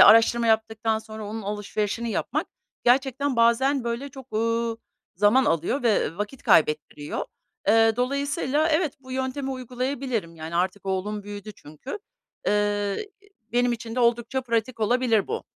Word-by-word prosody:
araştırma 230 +1 +7
yaptıktan 220 0 +1
sonra 220 -1 -8
onun 215 +1 -5
alışverişini 210 +2 -2
yapmak - - -1 0.4
gerçekten 265 +1 +2
bazen, 240 +3 +3
böyle, 235 +4 -3
çok, 265 -3 -12
uuu, 230 +1 0 0.4
zaman 210 +7 +5
alıyor 170 - +1
ve, 225 -3 +4
ııı, 165 +6 -7
vakit 210 +6 -4
kaybettiriyor. 150 -1 +2 0.4
Eee, 225 +1 +6
dolayısıyla 280 +3 +1
evet, 310 -2 +1
bu 260 -1 -10
yöntemi 265 +1 -2
uygulayabilirim 255 -7 -3
yani 160 +2 -5
artık 190 +2 -1
oğlum 200 +2 -2
büyüdü 205 +1 -8
çünkü. 155 - -8 0.5
Eee, 205 - 0 0.4
benim 245 0 +3
için 230 0 -5
de 255 - 0
oldukça 235 +2 +2
pratik 230 0 -1
olabilir 230 -1 +2
bu. 455 - -3
230 Hz, 140 wpm, -25 LUFS, 210-260 Hz, 0.5 s, araştırma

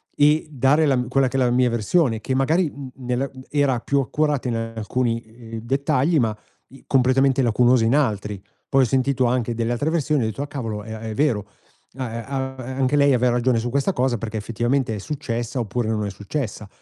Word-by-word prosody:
e 150 +2 +3
dare 140 +3 +3
la 135 -3 +3
m 125 -1 -1
quella 135 0 +3
che 135 - -2
è - - +2
la 125 -1 +3
mia 125 0 +3
versione 120 - +1
che 130 +4 -2
magari, 160 +6 +2
mhmm, 140 -2 -8
nella 125 +1 -2
mhmm, 130 - -11
era 140 -4 +1
più 140 +4 0
accurata 145 0 0
in 115 - -1 0.2
alcuni, 115 +1 -1
ehm, 115 0 -10
dettagli, 140 +5 +1
ma 110 -3 0 0.3
i 135 - -16
completamente 135 +1 +3
lacunosa 120 0 +3
in 120 +5 +3
altri. 105 -7 0 0.3
Poi 135 0 +4
ho - - +4
sentito 130 +1 +1
anche 120 -1 0
delle 115 0 -1
altre 145 +6 -1
versioni 150 -3 +1
e - - 0
ho - - 0
detto: 135 +6 -4
"Ah, - - -6
cavolo 115 -7 -5
è 110 +1 -7
a 110 - -7
è 110 -1 -5
vero, 120 -8 +1 0.5
a 130 -3 -3
ehm, 115 0 -5
a 130 -1 -3 0.2
anche 135 +2 +2
lei 140 -1 +5
aveva 125 0 +3
ragione 120 -1 +2
su 120 - -2
questa 140 +9 +1
cosa, 125 -3 +1
perché 110 0 -5
effettivamente 120 +2 -1
è - - -4
successa, 120 -1 -4
oppure 115 0 -2
non 105 -2 -1
è - - -2
successa". 105 +1 -5
125 Hz, 220 wpm, -22 LUFS, 115-140 Hz, 0.5 s, lei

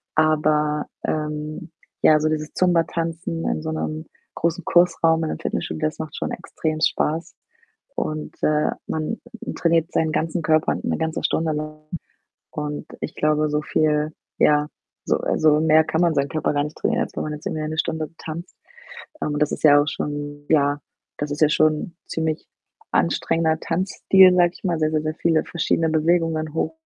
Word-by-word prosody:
aber, 150 -1 +2 0.2
ähm, 150 +1 -3 0.3
ja, 155 -1 +6
so 155 +1 +1
dieses 155 -1 -3
Zumba-Tanzen 165 -1 0
in - - -1
so 160 - -3
'nem 155 0 -3 0.3
großen 170 +1 -1
Kursraum 165 -2 +3
in 155 - -1
einem - - -5
Fitnessstudio, - - -3
das 155 - -6
macht 160 -1 -6
schon - - -3
extrem 155 -1 -3
Spaß. 160 +1 0 0.6
Und, 155 -8 -3
äh, 150 0 +2 0.2
man 160 +8 -2 0.4
trainiert 165 0 +2
seinen 160 -1 +1
ganzen 165 +2 -1
Körper 155 0 +2
'ne - - -2
ganze 160 0 -2
Stunde 160 -1 +1
lang 155 0 -5 0.7
und 150 -1 -4
ich - - -4
glaube, 155 0 +2
so 150 0 0
viel 150 0 +1 0.3
ja, 150 0 +4 0.4
so - - +2
also, 155 -1 +3
mehr 160 0 +5
kann 160 +1 -1
man 170 -2 +3
seinen 140 0 +1
Körper 155 - -1
gar 145 0 +1
nicht 150 +1 -7
trainieren, 235 +1 +1
als - - -9
wenn - - -2
man 155 - -3
jetzt 150 - -9
irgendwie 155 - -2
eine 155 +1 -4
Stunde 160 -1 -1
tanzt. 165 +3 -8 0.6
Ähm, 150 - -1
und 150 - -2
das 150 - +2
ist - - -5
ja 145 -2 +7
auch 145 - -2
schon 145 0 -4
ja, 145 -2 +3 0.4
das 145 - -3
ist 145 - -4
ja 155 - +7
schon 155 +2 +1
ziemlich 160 -1 -2 0.5
anstrengender 160 - +1
Tanzstil, 185 +2 +4
sage 175 -1 +4
ich - - -16
mal, 175 -3 +1
sehr, 155 0 +1
sehr, 155 -1 +1
sehr 155 0 -2
viele 165 -1 +1
verschiedene 165 -1 0
Bewegungen, 160 -1 +1
hoch, 165 - -1
155 Hz, 175 wpm, -22 LUFS, 150-165 Hz, 0.7 s, ja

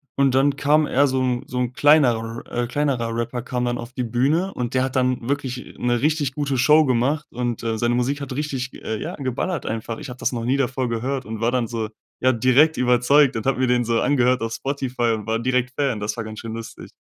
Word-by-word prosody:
Und 135 -2 +2
dann 140 +1 +3
kam 150 +1 +3
eher 140 +1 +3
so 130 0 0
'n 125 -1 0
so 125 - -5
'n 125 0 -1
kleinerer 120 -7 +3
R 120 0 -2
kleinerer 125 -4 -1
Rapper 120 +1 -3
kam 125 0 -2
dann 120 0 -1
auf 120 - -7
die 125 - -2
Bühne 140 +11 +1
und 125 0 -4
der 130 - +3
hat 130 -1 -3
dann 125 -2 0
wirklich 130 -3 -3
'ne 120 -1 +1
richtig 150 -2 +1
gute 140 -3 -1
Show 150 +4 +5
gemacht 135 +5 +1
und, 120 -1 -3
äh, 115 -1 -2
seine 120 +1 +1
Musik 135 +4 -1
hat 140 - -6
richtig, 135 -3 -3
äh, 110 -1 -3
ja, 175 - -4
geballert 140 +5 -3
einfach. 115 0 -4
Ich - - -8
habe 125 0 -9
das - - 0
noch 115 -2 -3
nie 130 +3 +2
davor 130 -2 -1
gehört 130 +4 -2
und 110 0 -6
war 115 - +2
dann 125 -2 +1
so, 110 -1 -3 0.3
ja, 130 - +3
direkt 130 +7 +4
überzeugt 125 +3 +4
und 110 +4 -3
habe 135 - +2
mir 130 - +2
den 125 0 +2
so 115 0 +1
angehört 130 -3 +2
auf 115 0 -3
Spotify 130 -2 -1
und 105 -2 -7
war 110 +1 -1
direkt 125 +1 0
Fan. 135 -7 0
Das 105 +1 -3
war 115 - -3
ganz 110 0 -8
schön 115 -1 -6
lustig, 115 0 -8
125 Hz, 240 wpm, -22 LUFS, 120-140 Hz, 0.3 s, Show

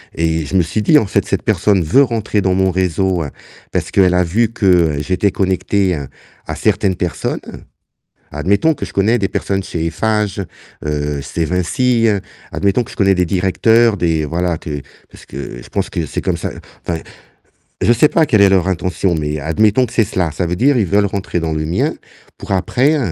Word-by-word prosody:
Et 80 -1 0
je 95 - -5
me 95 - +5
suis 85 +6 -2
dit: 150 +5 +6
«En 105 - -2
fait, - - 0
cette - - -1
personne 100 -3 +2
veut 130 - +4
rentrer 110 -4 -1
dans 95 0 +1
mon 95 0 +2
réseau, 95 -1 0 0.5
parce - - -2
qu'elle 95 -2 +4
a 90 0 +3
vu 110 +7 +1
que 90 -9 +2
j'étais 90 +5 0
connecté 95 -1 0
à 70 -2 -6 0.4
à - - -3
certaines 100 -2 +1
personnes». 90 -1 -3 0.9
Admettons 100 - +1
que - - -5
je - - -10
connais 110 +5 +2
des 95 -1 0
personnes 95 0 -2
chez 80 -3 -3
Eiffage, 105 +2 -1 0.4
heu, 75 -1 -2
chez 80 +4 -3
Vinci, 115 +7 +1 0.4
admettons 100 +5 +1
que - - -12
je - - -13
connais 95 -1 +3
des 90 - +1
directeurs, 105 +6 +3
des 80 -3 0
voilà 85 +2 -1
que 75 -2 -5 0.3
parce - - -15
que 65 -2 -8
je - - -15
pense - - -2
que 85 - -3
c'est - - -4
comme - - -1
ça, - - -2 0.3
enfin, 85 -2 -2 0.8
je 120 - +5
sais 120 +6 +4
pas 160 - +3
quelle 110 -8 +3
est 100 - +7
leur 95 -2 +2
intention, 90 0 -1
mais 75 -1 -2
admettons 105 - +2
que 115 - -13
c'est 115 -2 +3
cela, 90 -7 -1
ça 85 +3 -2
veut 90 +1 -2
dire, 135 +4 +3
ils 105 - +2
veulent 100 +3 +2
rentrer 90 -2 -2
dans 80 -1 -2
le 75 0 -2
mien, 85 +4 0 0.5
pour - - -6
après 130 - +2
95 Hz, 200 wpm, -17 LUFS, 85-105 Hz, 0.9 s, est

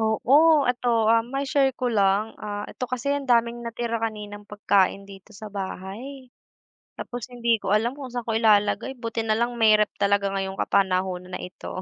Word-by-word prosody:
Oo, 280 +8 +4
ito, 245 0 -4 0.2
ah, 230 - +5
mai-share 275 0 +1
ko 255 - -2
lang. 200 +1 +2
Ah, 205 -1 -5
ito - - -5
kasi 255 +3 -2
ang 280 -2 -3
daming 235 0 +2
natira 230 0 -3
kaninang 210 -2 -5
pagkain 200 -1 +1
dito 195 +2 -14
sa 210 0 -10
bahay. 215 +7 -7 0.6
Tapos 245 -2 -6
hindi 235 -1 +1
ko 190 - -1
alam 230 +4 +1
kung 270 -3 -7
saan 245 -2 -4
ko 225 - 0
ilalagay, 220 +3 +2
buti 230 -1 -4
nalang 235 +3 +1
may 215 -1 +6
ref. 210 - +2
talaga 200 0 +2
ngayong 195 0 -3
kapanahunan 185 -1 0
na - - -8
ito. 180 0 -7
220 Hz, 175 wpm, -24 LUFS, 200-245 Hz, 0.6 s, may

